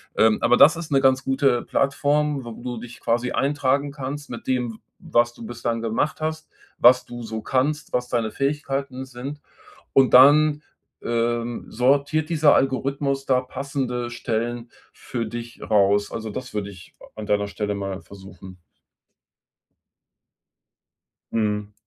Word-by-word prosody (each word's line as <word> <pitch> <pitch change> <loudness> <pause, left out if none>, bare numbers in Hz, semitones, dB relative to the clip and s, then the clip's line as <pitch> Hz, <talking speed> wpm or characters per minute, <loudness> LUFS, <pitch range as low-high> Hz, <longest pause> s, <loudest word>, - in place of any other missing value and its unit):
Ähm, 110 -1 +4
aber 125 +1 +4
das 160 +4 +7
ist 165 -2 -7
'ne 135 - +3
ganz 130 0 +3
gute 135 -2 +1
Plattform, 145 0 0
wo 120 - -7
du 120 +1 -6
dich 120 0 -11
quasi 120 +1 0
eintragen 140 0 0
kannst 145 +1 -6
mit 120 - -8
dem, 125 -3 -1
w - - -12 0.2
was 120 0 +1
du 115 - -12
bislang 115 0 -3
gemacht 115 +8 -1
hast, 155 0 -3 0.3
was 125 +1 +6
du 120 -1 -8
so 110 -1 -5
kannst, 145 +4 -1
was 125 0 -1
deine 115 -2 0
Fähigkeiten 135 -2 -2
sind. 130 +3 -8 0.5
Und 135 -1 +4
dann, 145 +3 +7 0.4
ähm, 120 0 -1
sortiert 145 +6 +1
dieser 155 -3 +5
Algorithmus 135 +1 0
da 130 -1 +3
passende 130 -2 -3
Stellen 120 0 -3 0.2
für 115 -2 -5
dich 115 +1 -8
raus. 100 -1 +3
Also, 110 -1 -5
das 125 +1 -7
würde 100 -1 -3
ich 90 -3 -15 0.2
an 110 - -6
deiner 105 0 +1
Stelle 105 0 -3
mal 100 -1 -4
versuchen. 95 -2 -13 2.7
Mhm. 105 -2 -1
125 Hz, 145 wpm, -23 LUFS, 115-140 Hz, 2.7 s, das